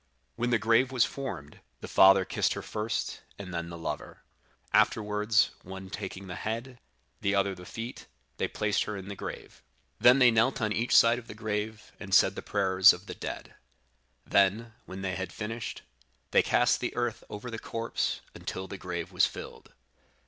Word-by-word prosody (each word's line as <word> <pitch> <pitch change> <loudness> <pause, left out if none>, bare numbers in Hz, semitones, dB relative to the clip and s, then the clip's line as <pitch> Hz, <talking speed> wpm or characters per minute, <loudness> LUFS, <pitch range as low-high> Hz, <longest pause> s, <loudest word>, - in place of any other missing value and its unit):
When 120 +1 -1
the 120 - +4
grave 115 +4 +3
was 125 -3 +3
formed, 130 - -6 0.2
the - - -8
father 95 0 +7
embraced 95 - 0
her - - -6
first, 105 +1 -3 0.2
and 90 -3 -8
then 85 0 -3
the 85 - -7
lover; 80 - -6 0.5
afterwards, 105 0 +3
one 95 +1 -9
taking 100 -1 -6
the 90 - -7
head, 115 +3 -4 0.4
the 100 0 +1
other 100 0 +2
the 90 -1 -11
feet, 115 +2 -7 0.3
they - - 0
placed 105 -1 0
her 105 -1 -4
in 95 +1 -8
the 100 - -5
grave. - - -8 0.4
Then 125 +2 +7
they 125 -3 +6
knelt 115 +4 +2
on 110 -2 0
each 115 +3 +1
side 115 +1 +6
of 120 - -14
the - - -9
grave, 110 -1 -4
and - - 0
said - - +6
the - - -6
prayers 95 -2 +5
of 90 +3 -10
the - - -6
dead. - - -7 0.7
Then, 105 +4 +2
when 95 +1 -7
they 95 -1 -1
had 95 -2 -4
finished, 115 +1 -5 0.5
they - - +6
cast - - +2
the - - -3
earth 120 -2 -2
over 105 +4 -7
the 115 - -5
corpse, 115 +1 -2
until 95 0 -6
the 100 - -8
grave 85 -2 -5
was - - +4
filled. - - -10
105 Hz, 185 wpm, -29 LUFS, 95-115 Hz, 0.7 s, father